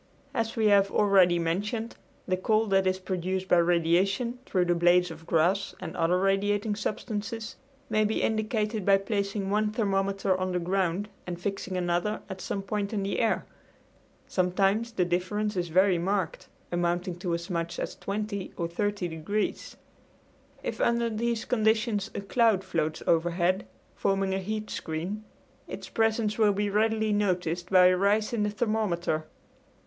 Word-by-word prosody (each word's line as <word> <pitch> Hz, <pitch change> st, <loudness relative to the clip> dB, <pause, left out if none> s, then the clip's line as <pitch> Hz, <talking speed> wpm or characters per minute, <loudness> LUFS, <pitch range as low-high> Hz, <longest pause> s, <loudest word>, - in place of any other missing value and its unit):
As 225 Hz, -2 st, -1 dB
we 225 Hz, -2 st, +1 dB
have 200 Hz, -1 st, +5 dB
already 190 Hz, -4 st, +4 dB
mentioned, 205 Hz, +7 st, -2 dB, 0.3 s
the 185 Hz, -, +2 dB
cold 215 Hz, +3 st, +1 dB
that 195 Hz, -1 st, +3 dB
is 185 Hz, 0 st, +1 dB
produced 185 Hz, 0 st, -3 dB
by 180 Hz, -, +4 dB
radiation 175 Hz, +8 st, +2 dB
through 180 Hz, -2 st, +1 dB
the 175 Hz, -, +2 dB
blades 175 Hz, 0 st, +3 dB
of 165 Hz, +1 st, -11 dB
grass 175 Hz, +5 st, +1 dB
and 175 Hz, -3 st, -6 dB
other 170 Hz, +2 st, +2 dB
radiating 205 Hz, +2 st, +1 dB
substances 215 Hz, +1 st, -4 dB, 0.3 s
may 215 Hz, -1 st, +2 dB
be 215 Hz, +1 st, 0 dB
indicated 215 Hz, -1 st, 0 dB
by 195 Hz, +1 st, +5 dB
placing 200 Hz, 0 st, -2 dB
one 210 Hz, +1 st, +2 dB
thermometer 195 Hz, -3 st, 0 dB
on 185 Hz, 0 st, -2 dB
the 180 Hz, -, +1 dB
ground 185 Hz, +2 st, 0 dB, 0.2 s
and 175 Hz, -1 st, -4 dB
fixing 195 Hz, 0 st, -3 dB
another 175 Hz, +4 st, 0 dB
at 190 Hz, -1 st, -6 dB
some 195 Hz, +2 st, -3 dB
point 205 Hz, +1 st, -2 dB
in 200 Hz, -2 st, -1 dB
the 195 Hz, -, -1 dB
air. 225 Hz, -2 st, +1 dB, 0.8 s
Sometimes 195 Hz, +5 st, +1 dB
the 180 Hz, -5 st, +1 dB
difference 200 Hz, +4 st, -1 dB
is 175 Hz, -1 st, -1 dB
very 185 Hz, +2 st, +3 dB
marked, 185 Hz, -1 st, -2 dB, 0.2 s
amounting 175 Hz, +1 st, -1 dB
to 175 Hz, -2 st, -1 dB
as 170 Hz, +1 st, -6 dB
much 170 Hz, 0 st, -2 dB
as -, -, -4 dB
20 200 Hz, -1 st, -4 dB
or 170 Hz, -, -1 dB
30 205 Hz, +2 st, -2 dB
degrees. 170 Hz, +6 st, -3 dB, 0.9 s
If -, -, -3 dB
under 235 Hz, 0 st, +2 dB
these 230 Hz, +1 st, -1 dB
conditions 220 Hz, -2 st, +1 dB
a -, -, -2 dB
cloud 210 Hz, -1 st, +2 dB
floats 160 Hz, -4 st, -2 dB
overhead, 175 Hz, +3 st, +1 dB, 0.3 s
forming 195 Hz, -1 st, 0 dB
a 190 Hz, -, 0 dB
heat 215 Hz, +2 st, -4 dB
screen, 175 Hz, +7 st, -4 dB, 0.4 s
its -, -, -7 dB
presence 225 Hz, -1 st, +1 dB
will 210 Hz, -2 st, +5 dB
be 205 Hz, +1 st, -1 dB
readily 220 Hz, +1 st, +2 dB
noticed 180 Hz, -3 st, 0 dB
by 185 Hz, -1 st, +6 dB
a 185 Hz, 0 st, +6 dB
rise 205 Hz, +4 st, +2 dB
in 230 Hz, -, 0 dB
the 210 Hz, -, +1 dB
thermometer. 205 Hz, -8 st, -1 dB
195 Hz, 160 wpm, -28 LUFS, 180-215 Hz, 0.9 s, by